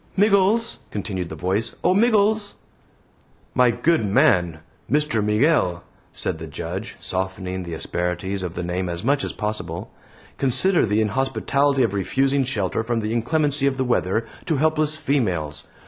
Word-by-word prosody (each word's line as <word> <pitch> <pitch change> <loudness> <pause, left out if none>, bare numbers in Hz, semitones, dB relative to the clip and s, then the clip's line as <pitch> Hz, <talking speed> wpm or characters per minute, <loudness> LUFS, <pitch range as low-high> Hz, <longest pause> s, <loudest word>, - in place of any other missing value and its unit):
"Miggles!" 205 +3 +3
continued 95 -4 -4
the 80 - -6
voice. 95 +8 -1
"O - - +4
Miggles!" 215 -1 +2 1.0
"My 125 -1 +4
good 160 +4 +2
man! 90 -5 +3 0.3
Mr. 150 -7 +2
Myghail!" 105 - +2 0.3
said - - -3
the - - -7
Judge, - - -6
softening 95 0 -3
the 85 -2 -5
asperities 90 +4 -2
of 90 -2 -3
the 90 - -3
name 90 +1 -2
as 85 0 -4
much 140 +3 +2
as - - -2
possible. 90 -6 -4 0.5
"Consider 150 +4 +2
the 105 +2 +2
inhospitality 135 +4 +1
of 115 - 0
refusing 135 +8 +1
shelter 110 -4 -1
from 115 0 -1
the 110 +1 -2
inclemency 145 +4 +1
of 135 -1 0
the 130 - 0
weather 115 -2 +1 0.2
to 160 - +1
helpless 155 +1 +1
females. 100 - -1
115 Hz, 145 wpm, -23 LUFS, 95-145 Hz, 1.0 s, O